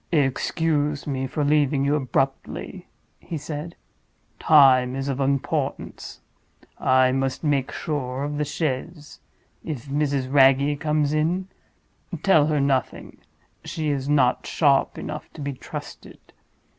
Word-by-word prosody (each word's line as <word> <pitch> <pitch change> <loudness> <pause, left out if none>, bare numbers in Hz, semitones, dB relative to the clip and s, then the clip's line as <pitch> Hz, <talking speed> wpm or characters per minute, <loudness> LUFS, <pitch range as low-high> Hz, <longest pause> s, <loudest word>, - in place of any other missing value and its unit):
"Excuse 150 0 0
me 135 -2 -2
for 150 +3 -2
leaving 145 -1 +2
you 140 - +2
abruptly," 135 -1 -2 0.3
he 165 - -6
said. 150 +2 -6 0.6
"Time 130 -4 +5
is 135 0 -3
of 135 -1 -2
importance; 135 0 -2 0.6
I 130 0 +4
must 135 +2 -2
make 140 -4 0
sure 135 -4 -3
of 145 0 -3
the - - +1
chaise. 150 +1 -4 0.4
If 150 -6 -5
Mrs. 140 -2 -1
Wragge 140 +1 +4
comes 150 -1 0
in, 175 +5 0 0.7
tell 160 -7 +5
her 155 -1 +1
nothing—she 140 +3 -4
is 140 -1 -3
not 130 -4 +2
sharp 140 -4 +2
enough 150 0 -7
to 155 - -9
be 140 0 -3
trusted. 130 - -9
145 Hz, 120 wpm, -24 LUFS, 135-150 Hz, 0.7 s, Time